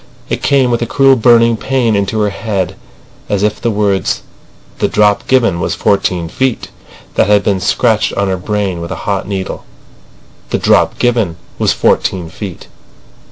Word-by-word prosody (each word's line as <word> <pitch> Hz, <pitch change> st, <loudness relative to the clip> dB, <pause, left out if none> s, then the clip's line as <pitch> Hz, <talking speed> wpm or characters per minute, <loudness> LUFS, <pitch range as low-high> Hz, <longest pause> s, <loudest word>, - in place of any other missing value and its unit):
It -, -, -2 dB
came 135 Hz, -3 st, +2 dB
with 120 Hz, -, 0 dB
a 120 Hz, -, -1 dB
cruel 135 Hz, +1 st, +4 dB
burning 115 Hz, -1 st, +4 dB
pain 120 Hz, -3 st, 0 dB
into 100 Hz, +2 st, 0 dB
her 105 Hz, -1 st, +1 dB
head, 100 Hz, -3 st, -3 dB, 0.5 s
as 100 Hz, -1 st, 0 dB
if 105 Hz, 0 st, -1 dB
the 120 Hz, -, 0 dB
words 100 Hz, -3 st, 0 dB, 0.6 s
"The -, -, +2 dB
drop 105 Hz, -1 st, +2 dB
given 115 Hz, -9 st, +2 dB
was -, -, -1 dB
fourteen 90 Hz, -4 st, 0 dB
feet" 130 Hz, +8 st, -2 dB, 0.5 s
had 105 Hz, 0 st, +3 dB
been 100 Hz, -2 st, +1 dB
scratched 110 Hz, +3 st, +1 dB
on 100 Hz, 0 st, 0 dB
her 95 Hz, -1 st, -1 dB
brain 95 Hz, -2 st, -2 dB
with 85 Hz, -, -6 dB
a -, -, -6 dB
hot 100 Hz, -2 st, -1 dB
needle. 95 Hz, -2 st, -4 dB, 0.9 s
"The -, -, 0 dB
drop -, -, +2 dB
given 115 Hz, -8 st, +1 dB, 0.2 s
was -, -, +2 dB
fourteen 90 Hz, -3 st, 0 dB
feet." 95 Hz, -3 st, -8 dB
105 Hz, 160 wpm, -14 LUFS, 95-115 Hz, 0.9 s, cruel